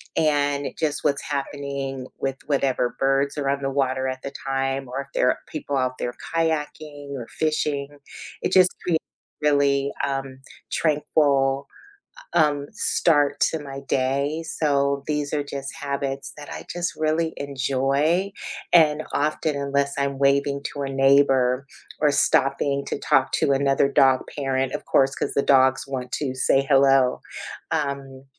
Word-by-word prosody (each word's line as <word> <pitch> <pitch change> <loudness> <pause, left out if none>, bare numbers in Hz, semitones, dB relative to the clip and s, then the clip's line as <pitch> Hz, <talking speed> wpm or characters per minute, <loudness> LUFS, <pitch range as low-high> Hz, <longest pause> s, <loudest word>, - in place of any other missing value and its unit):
and 145 -2 +1
just 150 -2 -1
what's 140 -1 +1
happening 140 -2 -4
with 135 -1 -1
whatever 135 -4 0
birds 135 +2 +1
are 140 - 0
on 140 0 0
the 135 - 0
water 130 -1 0
at 130 0 -4
the 140 - -6
time, 135 0 -1
or 130 +3 -4
if 140 - -11
there - - +3
are - - 0
people 145 -2 -3
out 130 -1 -1
there 120 - -3 0.2
kayaking 150 -2 -2
or 125 -3 -5
fishing. 150 -2 -1 0.6
It - - 0
just 185 -1 +6
creates 165 -3 0 0.4
really, 140 -2 +2
um, 135 -1 -4 0.3
tranquil, 140 -3 +1 0.7
um, 145 -2 +2
start 150 -8 +2
to 160 - +2
my 135 -2 -7
day, 140 +3 -1
so 140 -3 0
these 150 -1 -2
are 145 - 0
just 140 -1 -6
habits 140 -2 -4
that 145 -1 -9
I - - -8
just 175 0 -2
really 160 +1 0
enjoy 140 +7 0 0.4
and 155 -3 +5
often, 150 +1 0
unless 140 0 0
I'm 140 -1 -1
waving 140 0 +2
to 145 - -3
a 135 - -3
neighbor 135 -1 +3 0.3
or 150 -1 +4
stopping 140 0 +2
to - - -3
talk 135 -3 +2
to 140 - +2
another 135 0 +2
dog 135 -2 +4
parent, 135 -2 -1
of - - -4
course, 135 0 +3
'cause - - -3
the 140 - +2
dogs 135 -1 +4
want 130 -2 -5
to 135 -3 -2
say 135 +1 +3
hello, 135 -2 +4 0.5
um, 140 -3 -3
140 Hz, 150 wpm, -24 LUFS, 135-145 Hz, 0.7 s, just